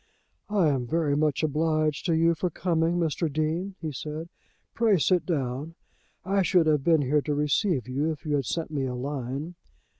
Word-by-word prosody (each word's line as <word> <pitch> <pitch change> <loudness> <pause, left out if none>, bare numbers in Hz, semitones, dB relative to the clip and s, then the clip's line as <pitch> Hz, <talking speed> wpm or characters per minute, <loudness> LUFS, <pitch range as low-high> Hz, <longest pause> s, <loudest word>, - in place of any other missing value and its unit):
"I 200 -6 +3
am 130 -4 -1
very 155 -1 +1
much 150 0 +1
obliged 155 +1 0
to 165 - +2
you 165 +1 +4
for 180 +2 -2
coming, 170 0 0
Mr. 165 -1 0
Dean," 160 +6 -1
he 155 - -2
said. 155 +4 -6 0.4
"Pray 225 -4 +3
sit 180 +2 +2
down. 145 0 -2 0.5
I 195 +1 +2
should 180 -2 +3
have 150 -3 +2
been 160 -1 +4
here 145 +3 +2
to 150 0 -2
receive 150 - +1
you 140 +5 0
if 155 +1 -8
you 150 - -1
had 135 - -2
sent 160 +5 -3
me 140 -3 -1
a 125 - -4
line." 135 +4 -4
155 Hz, 185 wpm, -27 LUFS, 145-170 Hz, 0.5 s, you